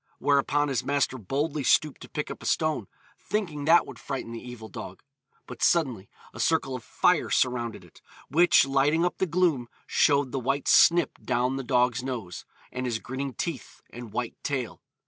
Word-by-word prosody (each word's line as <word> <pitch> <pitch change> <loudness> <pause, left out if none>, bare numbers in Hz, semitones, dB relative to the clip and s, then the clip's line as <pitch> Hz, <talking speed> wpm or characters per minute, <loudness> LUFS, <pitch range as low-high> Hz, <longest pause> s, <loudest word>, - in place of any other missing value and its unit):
Whereupon 145 +1 +2
his 130 -3 -1
master 140 -2 0
boldly 140 - -2
stooped 150 +2 +2
to - - -11
pick 150 - -4
up - - -8
a - - -5
stone, 155 -1 0 0.3
thinking 170 -9 -3
that 165 +3 +6
would - - -11
frighten 135 -4 -5
the 115 - -7
evil 125 -3 -9
dog; 95 -3 -9 0.4
but 125 -1 -10
suddenly 130 - +1 0.2
a - - -10
circle 160 -5 +1
of 125 - -7
fire - - +2
surrounded 120 -3 0
it, - - -20 0.3
which 175 +1 +5
lighting 140 +5 +2
up 180 - -2
the 190 - +1
gloom, 165 -8 +1 0.2
showed 140 -3 +2
the 135 - -2
white 135 +3 -1
snip 170 -3 +5
down 125 +1 0
the 135 - -3
dog's 125 -1 +2
nose, 120 -9 -6 0.3
and 125 0 -3
his 115 -2 -1
grinning 130 +2 -5
teeth, 155 -10 -5
and 120 -2 -9
white 120 +1 -3
tail. 130 -5 -3
135 Hz, 180 wpm, -27 LUFS, 125-150 Hz, 0.4 s, that